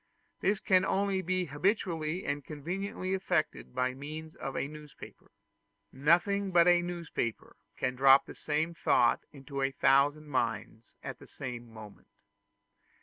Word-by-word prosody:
This 200 +1 +1
can 185 -4 +3
only 195 0 +1
be 185 0 -1
habitually 170 +1 -1
and 145 0 -2
conveniently 185 +6 -4
effected 180 -8 -1
by 125 0 0
means 155 +4 -8
of 135 - -5
a - - -1
newspaper; 150 -1 -12 0.6
nothing 175 +8 +2
but 175 -1 +5
a 175 0 +6
newspaper 170 -10 -4 0.2
can 125 -1 -1
drop 135 +1 +7
the - - -9
same 155 +3 -1
thought 125 -7 +3
into 140 -1 -6
a 135 - +2
thousand 140 +3 +3
minds 115 -4 -3
at - - -6
the - - -14
same 120 -3 -7
moment. 110 -2 -12
150 Hz, 140 wpm, -31 LUFS, 135-180 Hz, 0.6 s, drop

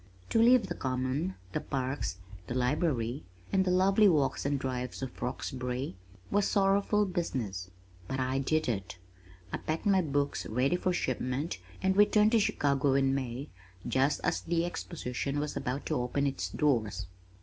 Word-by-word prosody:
To 225 - +4
leave 240 -1 +6
the 175 - -3
Common, 130 +6 -1 0.2
the - - -2
parks, 130 -8 -2 0.3
the 120 - -3
Library 130 -1 0 0.3
and 190 -1 +4
the 185 - 0
lovely 195 +3 +5
walks 140 -5 +1
and 140 0 +1
drives 130 -1 -3
of 130 - -7
Roxbury, 125 -1 -3 0.4
was 205 0 +3
sorrowful 200 +1 +3
business 120 - -3 0.4
but 135 - -3
I 130 +1 0
did 155 +3 +1
it! 100 -6 -3 0.6
I - - +1
packed 155 +1 -3
my 195 -2 +4
books 145 -3 -1
ready 125 +8 +1
for 180 +1 0
shipment 130 0 -2 0.2
and 190 0 +3
returned 210 +1 +5
to 230 - +5
Chicago 140 -7 +2
in 135 -1 +3
May 130 +1 -3 0.4
just 135 +3 +2
as 180 - +1
the 170 0 0
Exposition 145 -5 -3
was 150 0 -3
about 130 +3 -3
to 150 -6 0
open 140 +3 0
its 135 -1 -1
doors. 115 - 0
140 Hz, 160 wpm, -30 LUFS, 125-180 Hz, 0.6 s, leave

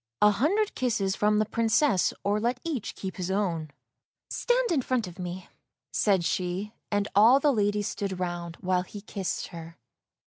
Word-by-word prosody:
" 115 - -56
A 210 - +7
hundred 365 - +1
kisses 215 -6 0
from 210 0 +2
the 215 - +3
Princess, 230 - +2
or 205 +1 +1
let 240 +3 0
each 300 -10 -3
keep 190 -1 -6
his 180 -1 -3
own." 175 -6 -1 0.3
" - - -61 0.3
Stand - - +1
in 300 -5 +2
front 250 -2 0
of 180 0 -11
me," 180 +1 -5 0.5
said 190 -5 +2
she, 185 +5 -2 0.2
and 205 -1 +1
all 225 +7 +7
the 285 0 +3
ladies 205 -2 +1
stood 195 -2 -4
round, 175 -2 -3
while 185 -1 +1
he 200 +3 -9
kissed 195 -2 -4
her. 165 0 -10
205 Hz, 180 wpm, -27 LUFS, 185-235 Hz, 0.5 s, A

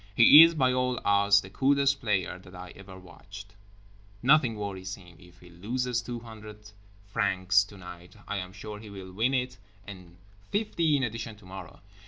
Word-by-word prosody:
He 135 +6 +9
is, 165 0 +6
by 130 -4 +2
all 125 -1 -1
odds, 100 0 +4
the 95 - -13
coolest 140 +3 +1
player 95 -6 -2
that 90 0 -15
I 90 0 -10
ever 95 -1 -13
watched. 100 +3 -13 0.7
Nothing 130 -4 +4
worries 95 -2 -6
him. 90 -2 -17
If 90 -1 -19
he 90 0 -16
loses 120 +7 -3
two 120 0 -7
hundred 105 -2 -12 0.3
francs 95 -1 +1
tonight, 90 -3 -13
I 105 - -3
am 90 -1 -6
sure 105 +2 -9
he 105 0 -12
will 95 -2 -10
win 120 +7 0
it 125 -1 -3 0.3
and 90 -4 -12 0.3
fifty 170 -8 0
in 135 - -2
addition 115 -1 -5
tomorrow. 95 -2 -12
105 Hz, 170 wpm, -27 LUFS, 95-125 Hz, 0.7 s, He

